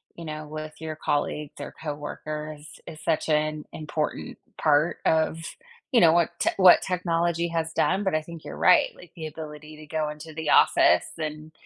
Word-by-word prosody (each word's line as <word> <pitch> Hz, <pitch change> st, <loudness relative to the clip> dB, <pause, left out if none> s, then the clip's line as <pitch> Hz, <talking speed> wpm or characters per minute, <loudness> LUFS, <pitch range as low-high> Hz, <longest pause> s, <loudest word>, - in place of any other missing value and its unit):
you 170 Hz, -, -9 dB
know, 155 Hz, -1 st, -6 dB
with 155 Hz, 0 st, -7 dB
your 160 Hz, -1 st, -5 dB
colleagues 150 Hz, 0 st, -2 dB
or 145 Hz, -, -7 dB
coworkers 150 Hz, 0 st, -6 dB, 0.2 s
is 155 Hz, -1 st, -9 dB
such 160 Hz, -2 st, 0 dB
an 155 Hz, 0 st, 0 dB
important 155 Hz, 0 st, -4 dB, 0.2 s
part 150 Hz, +1 st, +3 dB
of, 160 Hz, 0 st, +2 dB, 0.5 s
you 245 Hz, -, +5 dB
know, 165 Hz, -2 st, +7 dB
what 170 Hz, -1 st, +3 dB
te -, -, +2 dB
what 185 Hz, -2 st, +8 dB
technology 170 Hz, -2 st, 0 dB
has 165 Hz, -1 st, -2 dB
done, 190 Hz, +3 st, +1 dB
but 190 Hz, -, +1 dB
I 155 Hz, -, +1 dB
think 165 Hz, 0 st, -11 dB
you're -, -, -7 dB
right, -, -, +5 dB
like, 175 Hz, -1 st, -15 dB
the 160 Hz, -1 st, -5 dB
ability 155 Hz, 0 st, -9 dB
to 155 Hz, -, -11 dB
go 155 Hz, 0 st, -1 dB
into 150 Hz, +1 st, -9 dB
the 155 Hz, -1 st, -2 dB
office 90 Hz, -, +5 dB
and 155 Hz, 0 st, -5 dB
155 Hz, 180 wpm, -26 LUFS, 150-165 Hz, 0.5 s, what